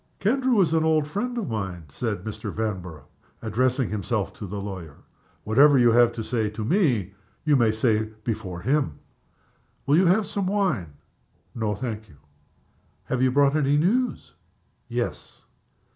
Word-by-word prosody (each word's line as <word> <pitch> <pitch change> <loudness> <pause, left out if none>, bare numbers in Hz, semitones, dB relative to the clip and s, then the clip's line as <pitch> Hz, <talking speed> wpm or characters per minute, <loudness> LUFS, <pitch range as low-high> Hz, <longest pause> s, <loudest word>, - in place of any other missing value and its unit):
"Kendrew 255 +2 +2
is 165 -3 +2
an 160 -1 +3
old 155 -2 +2
friend 240 +10 -3
of 230 - -2
mine," 95 -6 -4
said 105 - -3
Mr. 110 -1 -5
Vanborough, 95 -8 -4 0.4
addressing 125 +3 +1
himself 105 0 -2
to 105 - -8
the 100 +2 -5
lawyer. 95 -7 -7 0.5
"Whatever 140 +6 +5
you 120 -2 +5
have 120 0 +5
to 115 -1 -4
say 110 -2 -1
to 105 +1 -5
me 125 - +1 0.3
you 150 -2 +4
may 120 -4 +4
say 110 0 +1 0.2
before 100 -6 -4
him. 130 - 0 0.9
Will 145 +3 +4
you 185 0 +4
have 200 +4 +3
some 195 -1 -2
wine?" 180 - 0 0.6
"No 110 -3 -1
thank 110 -2 -5
you." 75 - -17 0.9
"Have 130 - -2
you 130 - +4
brought 140 +2 +3
any 145 -1 +2
news?" 235 +11 0 0.6
"Yes." - - -4
120 Hz, 155 wpm, -25 LUFS, 105-150 Hz, 0.9 s, Whatever